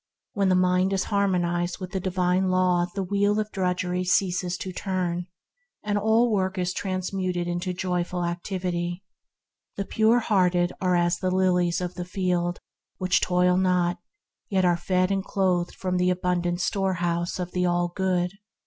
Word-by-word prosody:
When 200 -3 +1
the 185 - +4
mind 185 +1 +2
is 190 - +1
harmonized 175 -3 +1
with 185 -2 -7
the 190 - -2
Divine 185 0 +1
Law 180 -1 +2
the 195 - -1
wheel 205 +2 +1
of 215 0 -3
drudgery 180 -1 -1
ceases 180 -1 +1
to 185 0 -6
turn, 180 -2 -2 0.6
and 210 -1 -1
all 220 +3 +3
work 190 -1 0
is 180 0 -1
transmuted 185 -2 -2
into 175 +1 -2
joyful 180 -1 -2
activity. 175 0 -3 0.7
The 200 - -2
pure 220 +3 +3
hearted 180 -6 +2
are 180 -1 +2
as 175 0 +1
the 185 - 0
lilies 180 -2 +2
of 180 0 -3
the 180 -1 -5
field, 180 -1 -1 0.4
which 185 0 +2
toil 180 0 +3
not, 180 -2 +1 0.5
yet 190 -2 +2
are 175 -1 +4
fed 185 +2 0
and 195 -1 0
clothed 185 -3 0
from 185 -1 -2
the 180 0 +2
abundant 180 -1 0
storehouse 175 -3 -1
of 180 -1 -4
the 180 0 0
All 175 0 +1
Good. 185 +1 -1
180 Hz, 160 wpm, -25 LUFS, 175-190 Hz, 0.7 s, the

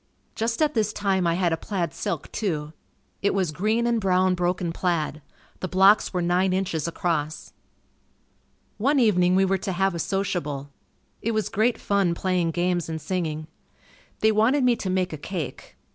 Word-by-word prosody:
Just 230 +6 0
at 305 -1 +1
this 215 -2 +1
time, 195 -4 0
I 170 - +2
had 175 -2 +1
a - - 0
plaid 175 -7 -3
silk 205 - -4
too. 155 -8 -2 0.5
It 200 0 +1
was 185 -5 +1
green 215 +9 0
and 235 -1 +1
brown 185 -1 +3
broken 180 -1 -1
plaid. 165 -4 -1 0.4
The 185 - -3
blocks 195 +3 +5
were 180 -2 -1
nine 180 +2 +2
inches 180 -5 -1
across. 160 -2 -2 1.3
One 275 +6 +3
evening 180 -6 +4
we 190 +1 +4
were 190 0 +1
to 190 0 -3
have 190 +1 +1
a 170 - -4
sociable. 150 -8 -2 0.5
It 230 - -1
was 215 -1 0
great 225 +3 +1
fun 195 -4 +1
playing 180 -2 0
games 175 0 0
and 160 0 -3
singing. 155 -2 -3 0.8
They 220 - +5
wanted 230 +6 +3
me 245 -1 +4
to 195 - -4
make 185 -2 0
a - - -4
cake. 170 0 -6
185 Hz, 175 wpm, -25 LUFS, 170-205 Hz, 1.3 s, blocks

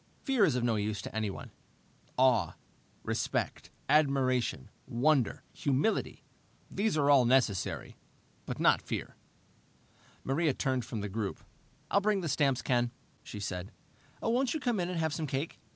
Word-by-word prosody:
Fear 265 -7 +4
is 150 -8 +1
of 125 - 0
no 115 -2 +2
use 105 0 -1
to - - -7
anyone. 110 -3 -3 0.7
Awe, 130 -3 +3 0.5
respect, - - -2 0.2
admiration, 135 - +2 0.2
wonder, 130 0 +2
humility 140 +10 0 0.5
these 200 -4 0
are 145 -1 +4
all 135 -3 +7
necessary. 120 -6 +1 0.5
But - - -4
not - - +4
fear." - - -5 1.1
Maria 145 +1 +1
turned 130 -4 0
from 115 -3 -4
the 100 - -3
group. 100 0 -4 0.5
"I'll 200 - +4
bring 205 -1 +2
the 170 - -2
stamps, 135 -3 +1
Ken," 120 -1 +2 0.3
she 105 - -8
said. 95 -2 -4 0.5
"Won't 245 +4 +1
you - - -1
come 240 -7 0
in 175 0 -1
and 180 - -3
have 160 -2 0
some 155 -1 -2
cake?" 135 +4 -3
135 Hz, 150 wpm, -31 LUFS, 115-160 Hz, 1.1 s, all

